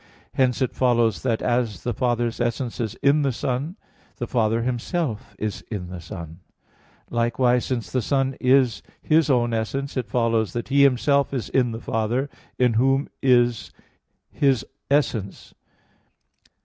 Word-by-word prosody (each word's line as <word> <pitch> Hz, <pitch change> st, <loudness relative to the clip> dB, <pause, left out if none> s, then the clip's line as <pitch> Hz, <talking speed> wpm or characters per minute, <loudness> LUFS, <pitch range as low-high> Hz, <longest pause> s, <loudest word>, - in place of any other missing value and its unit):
Hence 130 Hz, 0 st, +2 dB
it 125 Hz, -, -2 dB
follows 120 Hz, -4 st, +2 dB
that 115 Hz, -4 st, -1 dB
as 120 Hz, -6 st, 0 dB
the 120 Hz, -, -1 dB
Father's 120 Hz, 0 st, -1 dB
essence 120 Hz, +1 st, -2 dB
is 110 Hz, -4 st, -2 dB
in 140 Hz, +2 st, +4 dB
the 140 Hz, -2 st, +1 dB
Son, 130 Hz, +8 st, -3 dB, 0.4 s
the 120 Hz, -, -4 dB
Father 115 Hz, -1 st, +1 dB
Himself 125 Hz, -, -3 dB
is 105 Hz, -1 st, -4 dB
in 95 Hz, -5 st, -5 dB
the 90 Hz, -1 st, -7 dB
Son; 85 Hz, -2 st, -9 dB, 0.7 s
likewise, 120 Hz, +1 st, +2 dB
since 125 Hz, -4 st, -3 dB
the 130 Hz, -, +1 dB
Son 135 Hz, +2 st, 0 dB
is 130 Hz, -3 st, +3 dB, 0.2 s
His 155 Hz, 0 st, +3 dB
own 120 Hz, -3 st, +2 dB
essence, 135 Hz, +5 st, -2 dB
it 130 Hz, -, -3 dB
follows 115 Hz, -5 st, +1 dB
that 120 Hz, +1 st, -4 dB
He 140 Hz, +1 st, +4 dB
Himself 140 Hz, +1 st, +3 dB
is 120 Hz, -6 st, -3 dB
in 125 Hz, -2 st, +2 dB
the 115 Hz, -, -5 dB
Father 115 Hz, +5 st, -1 dB, 0.3 s
in 125 Hz, -2 st, +3 dB
Whom 135 Hz, +2 st, +2 dB
is 120 Hz, -3 st, +3 dB, 0.6 s
His 135 Hz, -5 st, +2 dB, 0.2 s
essence. 120 Hz, -9 st, -1 dB
120 Hz, 150 wpm, -23 LUFS, 115-135 Hz, 0.7 s, in